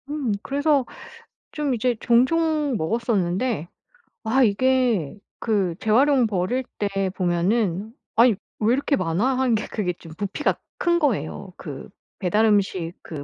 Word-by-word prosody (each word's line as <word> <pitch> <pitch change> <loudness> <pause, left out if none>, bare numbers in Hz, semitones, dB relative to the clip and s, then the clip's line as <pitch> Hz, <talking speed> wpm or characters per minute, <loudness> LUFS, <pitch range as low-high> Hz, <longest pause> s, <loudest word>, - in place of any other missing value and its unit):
음. 290 -6 -2
그래서 285 -1 +1 0.7
좀 295 -3 -1
이제 245 +1 0
종종 295 +4 +2
먹었었는데 200 - -1 0.6
아 255 +4 +3
이게 240 - +2 0.2
그 195 -6 0
재활용 255 +3 +3
버릴 210 +6 -1 0.2
때 195 -2 0
보면은 185 +3 0 0.2
아니 235 -1 +5 0.2
왜 220 +2 +3
이렇게 280 +2 +1
많아? 190 +10 0
하는 255 -3 +2
게 215 - -2
그게 185 -5 -2
좀 165 -2 -13
부피가 205 +8 -1 0.2
큰 345 -1 +2
거예요. 250 - -2
그 145 -5 -8 0.3
배달 210 +3 +2
음식 190 -5 +1
그 150 -4 -7
220 Hz, 245 characters per minute, -23 LUFS, 190-260 Hz, 0.7 s, 아니